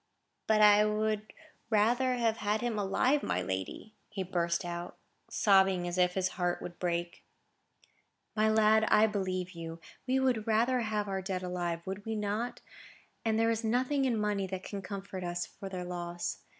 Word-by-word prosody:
"But 215 -1 +4
I 210 0 +7
would 215 0 -1 0.4
rather 240 +4 +3
have 230 -2 +1
had 210 0 0
him 235 -3 -1
alive, 250 +9 +2
my - - -1
lady," 95 - -4 0.2
he 200 -2 -3
burst 170 -1 -1
out, 175 0 -5 0.3
sobbing 190 -3 +3
as 175 +1 -2
if 180 0 +3
his 185 -1 +1
heart 175 0 +1
would 175 - -8
break. 170 -1 -2 1.1
"My 215 0 +3
lad, 220 0 +5
I 215 - +5
believe 185 -3 -2
you. 165 -1 -7 0.3
We 260 +1 +2
would 245 -4 +1
rather 235 +4 +3
have 215 -2 -1
had - - -12
our 190 0 -1
dead 185 -1 -3
alive, 175 -2 -3
would 195 +2 -5
we 225 +1 -3
not? 210 +3 -2 0.6
and 220 -1 +1
there 225 0 +3
is 225 0 -2
nothing 255 +5 +1
in 240 -4 +1
money 205 -2 0
that 190 0 -5
can 200 -1 -5
comfort 195 -1 -6
us 175 0 -2
for 195 -1 -9
their 180 -1 -5
loss. 175 -1 -4
205 Hz, 175 wpm, -31 LUFS, 180-220 Hz, 1.1 s, I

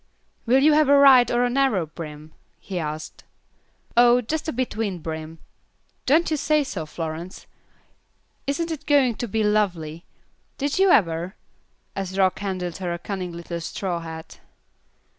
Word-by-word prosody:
"Will 260 +3 +4
you 305 +1 +6
have 300 -2 +4
a 285 0 +7
wide 260 -4 +7
or 240 0 +2
a 245 - +2
narrow 260 -10 +2
brim?" 155 -1 -9 0.3
he 185 -3 -5
asked. 155 -1 -6 0.7
"Oh, 240 +1 +6
just 300 +7 -3
a - - 0
between 225 -6 -2
brim. 160 0 -6 0.7
Don't 315 +5 +3
you 310 - +1
say 300 +1 +2
so, 175 - -5
Florence? 165 +3 -6 1.0
Isn't 330 +4 -1
it 315 - -6
going 275 -5 +4
to 240 - -3
be 220 +1 0
lovely? 180 -6 0 0.5
Did 285 +5 -1
you 385 0 +5
ever?" 175 - +2 0.6
as 195 -1 -4
Rock 190 -1 +2
handed 185 -4 -3
her 180 -2 -3
a 170 - -2
cunning 180 0 -5
little 170 0 -6
straw 175 +1 -3
hat. 160 -1 -9
195 Hz, 155 wpm, -24 LUFS, 170-265 Hz, 1.0 s, a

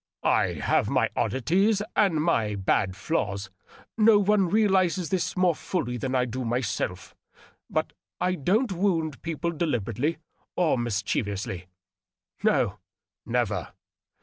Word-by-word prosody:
I - - +2
have - - +1
my - - +1
oddities 195 - +1
and 170 -7 +3
my 110 -11 +1
bad 95 -1 +1
flaws 100 - -2 0.2
— - - -22
no 220 0 +7
one 205 -2 +3
realizes 190 -4 +2
this 190 -1 -1
more 180 -2 +4
fully 155 -6 -3
than 130 +2 -2
I 125 -1 +3
do 130 +2 -4
myself; 115 -6 -2 0.6
but - - -1 0.3
I 180 0 +1
don't 195 - +1
wound 170 -6 0
people 165 +1 -2
deliberately 145 - -1 0.4
or 175 -5 +2
mischievously 105 -5 -2 0.4
— 90 0 -35
no, - - +2 0.5
never. - - -1
155 Hz, 125 wpm, -26 LUFS, 115-185 Hz, 0.6 s, no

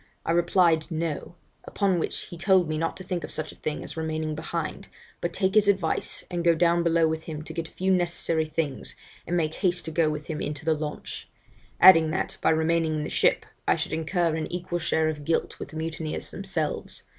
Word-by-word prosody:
I - - +1
replied, 170 -2 +3
No 165 +1 -3 0.3
upon 195 -4 +1
which - - -2
he - - -9
told 180 0 +3
me 155 - -1
not 165 +1 -1
to 185 - -8
think 180 -2 -3
of - - -5
such 155 - -3
a - - -15
thing 150 -1 -4
as - - -9
remaining 160 -1 -2
behind, 160 +1 -4 0.3
but 175 - -1
take 190 +2 0
his 210 -1 +5
advice 190 -5 0
and 175 -1 -1
go 170 -1 +5
down 170 +1 +3
below 165 -1 +3
with 160 0 -3
him 155 -2 -5
to - - -8
get 165 -1 -3
a - - -18
few 190 +1 0
necessary 175 -3 +1
things, 155 -3 -3 0.3
and 175 - 0
make 155 -2 0
haste 180 -1 0
to 160 - -3
go 160 -1 +2
with 150 0 -4
him 155 -2 -4
into 150 +1 -4
the 160 - +4
launch; 150 -1 -5 0.5
adding 165 -4 +8
that, 155 - -2
by - - +3
remaining 160 0 +2
in 150 - -1
the - - -5
ship, - - +2 0.2
I - - +5
should - - -3
incur 165 +1 0
an 160 -1 -3
equal 175 0 -3
share 160 -1 +1
of 150 -2 -3
guilt 165 +2 -1
with - - -6
the - - -12
mutineers 160 -1 -3
themselves. 185 -6 -2
165 Hz, 220 wpm, -26 LUFS, 155-175 Hz, 0.5 s, adding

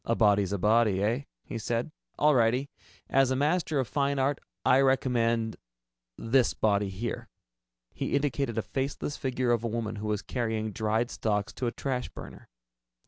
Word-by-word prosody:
"A 115 - 0
body's 100 -3 +3
a 100 - 0
body, 105 0 +3
eh?" 115 +6 +1 0.2
he 115 - -6
said. 115 +6 -2 0.3
"All 150 0 +4
righty. 125 +3 +2 0.4
As 135 -1 +3
a 130 - +1
master 150 +3 +1
of 130 -3 0
fine 140 0 0
art, 135 +1 +1 0.2
I 130 - +5
recommend 120 -4 +1 0.6
this 120 +2 +2
body 100 -2 +1
here." 105 +5 -5 0.6
He - - -2
indicated 140 -4 0
a 110 - 0
faceless 140 +2 -3
figure 130 -2 -1
of 120 -1 +1
a - - 0
woman 110 -1 -3
who 105 +1 -4
was 105 -1 -1
carrying 110 -2 -2
dried 110 +3 0
stalks 105 -1 -1
to 125 - -2
a - - 0
trash 130 -1 -3
burner. - - -11
115 Hz, 170 wpm, -28 LUFS, 110-135 Hz, 0.6 s, I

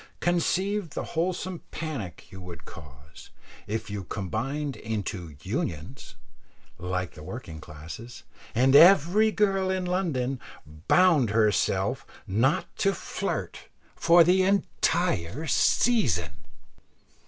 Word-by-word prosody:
Conceive 180 +1 0
the - - -2
wholesome 180 +1 -2
panic 145 - -6
you 95 0 -10
would 90 -2 -10
cause, 70 -1 -13 0.4
if 110 +2 -3
you 100 -1 -4
combined 125 - -3
into 105 -7 -5
"unions" 85 - -5 0.6
like 90 0 -3
the - - -12
working 90 -2 -8
classes, 80 +12 -10 0.3
and 130 +3 +4
every 185 +6 +7
girl 195 -3 +1
in 185 -1 -1
London 145 -9 -1 0.5
bound 170 - +4
herself 105 -1 +1 0.2
not 120 +10 +1
to 195 -1 +1
flirt - - -4 0.3
for 170 0 +6
the 180 +3 +4
entire 160 - 0
season! 155 - +2
130 Hz, 105 wpm, -27 LUFS, -, 0.6 s, every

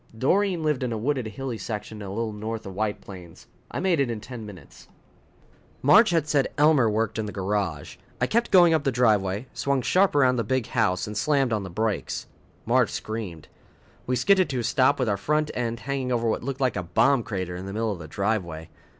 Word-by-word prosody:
Doreen 180 - +1
lived 150 -4 0
in 125 -2 -2
a 115 - -2
wooded, 130 +1 -1
hilly 120 +1 -5
section 105 +1 -6
a 100 - -6
little 110 +2 -3
north 110 +1 -5
of 95 - -7
White 105 +1 -2
Plains. 90 -4 -12 0.2
I - - -4
made 180 -4 +1
it 135 -3 +1
in 115 -2 -3
ten 115 -1 -8
minutes. 100 -3 -13 1.0
Marge 205 - +7
had 165 -4 +1
said 145 -3 +2
Elmer 145 -6 +4
worked 110 +1 -1
in 110 - -2
the - - -5
garage. 95 -6 -3 0.2
I - - +2
kept 235 +1 0
going 175 -3 +6
up 155 -3 +1
the 135 - +1
driveway, 105 -3 +1
swung 140 -2 0
sharp 185 +8 +3
around 130 -3 +4
the 115 - 0
big 130 +2 -1
house 110 -7 0
and 105 - -7
slammed 135 0 +1
on 105 - 0
the 95 - -7
brakes. 110 +4 -2 0.4
Marge - - +3
screamed. 105 -8 -6 0.6
We 125 - +1
skidded 185 - +3
to 130 - -2
a - - -5
stop 130 +5 +3
with 125 - 0
our 100 -2 +1
front 150 +8 0
end 115 -1 -3
hanging 135 -2 -3
over 115 -1 0
what 110 - 0
looked 135 +2 -5
like 130 -4 +1
a 95 - -1
bomb 120 +10 +2
crater 95 -5 -4
in 90 +2 -7
the 95 - -6
middle 110 +1 -1
of 95 - -5
the 80 - -8
driveway. 85 -4 -2
115 Hz, 220 wpm, -25 LUFS, 105-140 Hz, 1.0 s, Marge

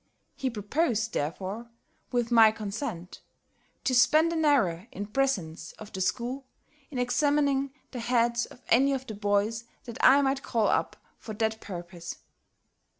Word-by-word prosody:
He 265 - -1
proposed, 225 - -1
therefore, 190 +10 -3 0.4
with 240 -1 0
my 225 -2 +8
consent, 200 -4 -6 0.6
to 260 - +1
spend 310 +7 +5
an 320 -1 0
hour, 215 - +2
in 205 - -5
presence 205 -9 -1
of 215 -1 -12
the 190 - -4
school, 250 +7 -2 0.4
in 275 - -6
examining 280 +2 +1 0.2
the 250 - -5
heads 235 0 +1
of 245 - -16
any 275 +4 +4
of 265 -1 -3
the 220 - -6
boys 205 +2 0 0.2
that 235 - -8
I 280 +2 +7
might 270 0 +1
call 225 -5 +1
up - - 0 0.2
for 220 - -7
that 220 +1 -1
purpose. 175 -2 -7
235 Hz, 150 wpm, -28 LUFS, 205-270 Hz, 0.6 s, my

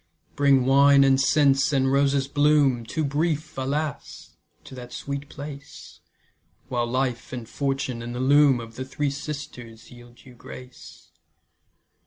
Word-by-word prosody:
Bring 140 -3 +3
wine 140 +1 +5
and 135 0 +3
scents, 135 0 +3
and 135 -1 +1
roses' 140 -1 +2
bloom, 145 -5 +2
Too 155 +5 -2
brief, 155 +2 -2
alas! 140 +3 -4 0.3
to - - -13
that 125 -1 -10
sweet 140 +2 -6
place, 145 0 -10 0.7
While 120 -2 -1
life, 125 -1 -2
and 120 -3 -7
fortune, 135 -3 -3
and 120 +1 -6
the - - -4
loom 140 0 +4
Of 115 -1 -10
the 130 - -4
Three 140 +2 -3
Sisters 125 -6 -8
yield 120 0 -16
you 130 - -14
grace. 125 +1 -13
135 Hz, 140 wpm, -24 LUFS, 125-145 Hz, 0.7 s, wine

